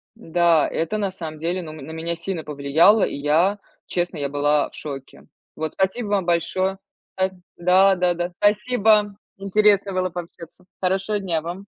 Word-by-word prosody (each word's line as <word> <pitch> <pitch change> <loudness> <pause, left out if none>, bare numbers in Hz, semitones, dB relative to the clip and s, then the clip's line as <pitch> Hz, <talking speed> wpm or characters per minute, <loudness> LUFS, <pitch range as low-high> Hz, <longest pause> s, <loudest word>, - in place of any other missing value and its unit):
Да, 170 -6 +2
это 165 +7 -2
на 200 -2 -1
самом 160 -4 -7
деле, 175 +3 -2
ну, 155 -2 -8
м, 155 - -10
на 160 - -8
меня 165 +1 -3
сильно 170 -1 -5
повлияло, 150 +8 +3
и - - -1
я, 160 +8 +2 0.3
честно, 175 -2 -2
я 140 -1 -2
была 145 +1 +1
в - - -17
шоке. 135 -3 -8 0.3
Вот, 155 -1 -4
спасибо 195 +4 -1
вам 200 -3 +1
большое. 180 +3 0 0.4
Да. 190 0 +2 0.3
Да-да-да, 180 -1 +3
спасибо! 210 -1 +3 0.2
Интересно 200 0 +2
было 185 0 0
пообщаться. 175 0 -10 0.2
Хорошего 195 +3 0
дня 170 -5 -1
вам. 175 +5 -7
180 Hz, 160 wpm, -22 LUFS, 160-195 Hz, 0.4 s, повлияло